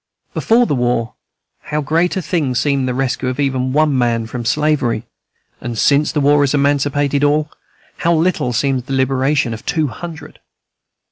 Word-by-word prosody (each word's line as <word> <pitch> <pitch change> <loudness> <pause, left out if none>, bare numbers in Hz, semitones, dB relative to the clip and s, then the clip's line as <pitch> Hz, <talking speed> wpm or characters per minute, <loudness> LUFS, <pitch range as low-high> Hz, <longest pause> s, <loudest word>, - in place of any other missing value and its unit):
Before 235 +2 +3
the - - -1
war, 120 -3 0 0.5
how 150 0 -2
great 165 +6 0
a 185 - -2
thing 150 -6 -1
seemed 140 +1 +1
the 125 - -1
rescue 130 0 -1
of 130 - -5
even 130 -2 0
one 150 0 +2
man 120 -2 +1
from 120 +1 -6
slavery; 130 -3 +1 0.6
and 120 -1 -5
since 145 +6 +3
the 150 - -1
war 145 +1 +4
has 145 0 +2
emancipated 145 0 +1
all, 150 +1 +1 0.5
how 170 0 +1
little 160 -6 +1
seems 130 +1 0
the 135 - -5
liberation 135 -1 +1
of 110 - -8
two 155 -3 0
hundred! 165 +2 -9
140 Hz, 165 wpm, -17 LUFS, 125-150 Hz, 0.6 s, war